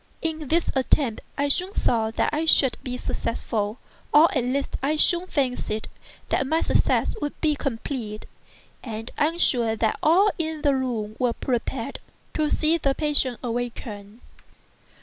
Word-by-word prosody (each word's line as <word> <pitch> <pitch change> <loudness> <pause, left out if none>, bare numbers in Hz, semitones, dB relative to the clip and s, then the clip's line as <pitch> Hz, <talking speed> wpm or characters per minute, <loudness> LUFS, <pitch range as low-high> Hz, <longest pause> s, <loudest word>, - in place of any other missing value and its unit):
In 315 -2 -3
this 335 +4 +1
attempt 260 -3 +1 0.2
I 285 - +1
soon 365 +7 +5
saw 225 -2 +1
that 225 - -1
I 310 +2 0
should 270 -5 +4
be 250 -1 -5
successful—or 230 +8 0
at 255 - +1
least 270 +3 -2
I 285 +3 +1
soon 345 +3 +3
fancied 250 -8 -2 0.4
that 265 - 0
my 320 +3 +1
success - - +1
would 290 - -4
be 310 -2 +2
complete—and 225 -2 -7
I - - +2
am 330 +2 -4
sure 235 -9 +3
that 220 0 0
all 380 +7 +4
in 315 -2 -3
the 285 - +3
room 235 -5 -2
were 250 -2 +1
prepared 250 +1 -3 0.3
to 305 -1 0
see 320 +2 +2
the 275 -2 +1
patient 285 -5 +3
awaken. 230 -3 -5
265 Hz, 150 wpm, -24 LUFS, 230-305 Hz, 0.4 s, soon